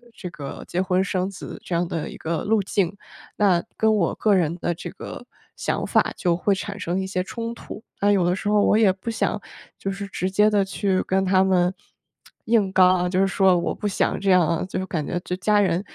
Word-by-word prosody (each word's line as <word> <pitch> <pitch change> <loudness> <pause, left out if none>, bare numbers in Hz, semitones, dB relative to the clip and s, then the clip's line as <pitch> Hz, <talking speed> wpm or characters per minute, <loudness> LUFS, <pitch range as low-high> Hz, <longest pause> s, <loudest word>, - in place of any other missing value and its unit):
这 180 - -7
个 140 -4 -8
结 180 - -2
婚 185 0 +1
生 185 -1 -1
子 185 - -9
这 175 - -4
样 170 0 0
的 165 -2 -4
一 - - -10
个 160 0 -3
路 215 0 +2
径， 195 0 -1 0.4
那 185 -5 +3
跟 220 0 +3
我 175 -5 +1
个 210 -2 +2
人 170 -2 +1
的 175 - -1
这 - - -7
个 - - -9 0.3
想 - - -2
法 - - +2
就 175 -2 +1
会 200 +2 +2
产 200 +2 -6
生 180 0 -2
一 190 - -4
些 185 -1 -1
冲 230 +4 -5
突。 220 - -10 0.2
但 205 +1 +3
有 190 -4 +3
的 180 +1 +2
时 205 - -3
候 210 -1 +4
我 210 - +4
也 210 -4 +5
不 190 +5 -6
想 220 -1 -1 0.4
就 195 - -3
是 200 +1 -5
直 185 -1 -2
接 210 +3 +4
地 200 -2 +2
去 190 0 0
跟 190 0 +1
他 190 0 +3
们 185 -1 +2 0.7
硬 220 -4 +3
刚 185 -1 +6
啊， 180 0 0
就 185 +1 +1
是 - - +4
说 190 -2 +3
我 170 - -1
不 210 - -3
想 200 - 0
这 195 -1 +1
样 180 -3 +5
啊， 165 0 0
就 185 - -4
是 190 - -2
感 155 -5 -2
觉 - - -2
就 180 - -4
家 205 +2 +3
人 180 -1 +1
190 Hz, 255 characters per minute, -23 LUFS, 180-205 Hz, 0.7 s, 刚